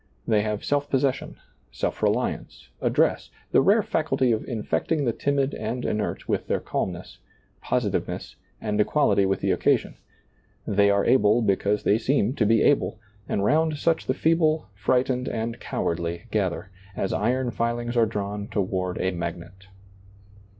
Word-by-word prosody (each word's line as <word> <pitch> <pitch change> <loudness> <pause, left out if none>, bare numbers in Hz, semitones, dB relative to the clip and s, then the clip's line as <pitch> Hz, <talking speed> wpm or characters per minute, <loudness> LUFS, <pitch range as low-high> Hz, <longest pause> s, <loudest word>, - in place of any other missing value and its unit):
They 110 -2 +3
have 105 -1 -3
self 145 0 0
pos 135 - +2
session, 135 -2 -1 0.3
self - - -3
reliance, - - -1
address, - - +1 0.2
the - - +5
rare - - +4
faculty 130 -2 +1
of 110 - 0
infecting 135 +6 -1
the 120 - +1
timid 140 +1 0
and 115 +3 -4
inert 105 0 -2
with - - -1
their - - 0
calmness, - - -4 0.4
positiveness, - - -2 0.2
and 105 -1 0
equality 100 -6 +2
with 95 0 -1
the - - +1
occasion; - - +1 0.7
they 100 0 +3
are 100 0 +2
able 120 -2 +4
because 100 0 +1
they 105 - +3
seem 130 -3 +1
to 105 - +2
be 115 0 +4
able, 140 -6 +2 0.3
and 100 - 0
round 155 +4 +2
such 165 +2 0
the 130 - +1
feeble, 160 -3 +2
frightened, 125 +5 0
and 115 0 -3
cowardly 85 +2 -3
gather, 95 -2 -1 0.2
as 95 - -2
iron 125 0 0
iilings 120 +1 -2
are 115 -2 +4
drawn 105 -1 -4
toward 95 -3 -2
a 95 - 0
magnet. 85 +2 -6
110 Hz, 150 wpm, -25 LUFS, 100-130 Hz, 0.7 s, the